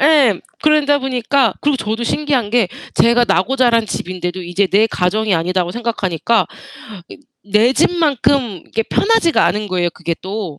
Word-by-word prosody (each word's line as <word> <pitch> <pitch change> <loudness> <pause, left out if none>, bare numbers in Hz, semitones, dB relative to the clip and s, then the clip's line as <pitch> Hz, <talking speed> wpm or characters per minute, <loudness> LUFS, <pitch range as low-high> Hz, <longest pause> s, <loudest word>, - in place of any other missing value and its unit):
예. 275 - +4 0.2
그러다 300 -2 +3
보니까 255 -3 0
그리고 290 -1 +1
저도 220 -1 -3
신기한 265 -5 -1
게 235 -5 +2 0.3
제가 235 +1 +3
나고 225 +10 +1
자란 235 -3 +3
집인데도 180 -1 -5
이제 175 +3 0
내 205 +4 +3
가정이 210 +1 0
아니다고 175 +1 -1
생각하니까 225 -3 -1 0.6
이 - - -11 0.3
내 220 +5 +4
집만큼 280 - +1
이렇게 225 - -2
편하지가 400 - +2
않은 210 0 -2
거예요 180 -2 0
그게 170 -1 -3
또. 190 -6 -6
225 Hz, 345 characters per minute, -17 LUFS, 185-270 Hz, 0.6 s, 예